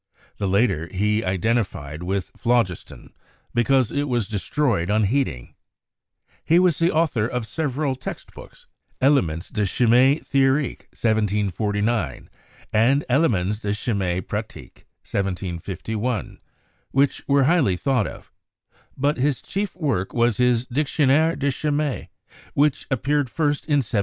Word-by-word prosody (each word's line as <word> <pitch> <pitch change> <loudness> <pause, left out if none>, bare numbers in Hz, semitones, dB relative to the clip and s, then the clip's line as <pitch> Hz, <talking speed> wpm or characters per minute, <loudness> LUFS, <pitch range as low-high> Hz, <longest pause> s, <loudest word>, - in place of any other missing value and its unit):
The 100 - -1
later 95 -5 +1
he 105 +3 0
iden 95 +6 +1
tified 75 -8 -4
with 95 +1 -3
phlogiston 120 -7 -1 0.4
because 125 0 +2
it 145 +1 -1
was 120 -6 0
destroyed 105 - 0
on 105 +1 +2
heating. 100 - -1 0.9
He 165 - +3
was 180 -3 +3
the 170 +1 +3
author 155 -9 +1
of 125 -2 -3
several 145 +3 -2
text 130 0 -8
books, - - -14 0.3
"Elemens 95 - +2
de 105 - -2
Chymie 125 +7 +4
Theorique" 135 0 +1
(1749) 105 - -1 0.4
and 125 +7 +3
"Elemens 105 - +2
de 100 -2 -2
Chymie 95 -5 -1
Pratique" - - -7 0.2
(1751), 100 +4 -3 0.5
which 140 +1 +1
were 140 -1 +4
highly 135 - +3
thought 125 0 +1
of; - - -11 0.7
but 145 +3 +1
his 135 0 +1
chief 200 0 -4
work 135 - -2
was 120 -2 +2
his 125 -1 +2
"Dictionnaire 145 +4 +2
de 140 0 0
Chymie," 150 0 -2 0.5
which 145 0 +1
ap 130 -4 -1
peared 145 -2 +1
first 145 0 -1
in 145 -4 +2
1766. - - -11
120 Hz, 130 wpm, -23 LUFS, 100-140 Hz, 0.9 s, Chymie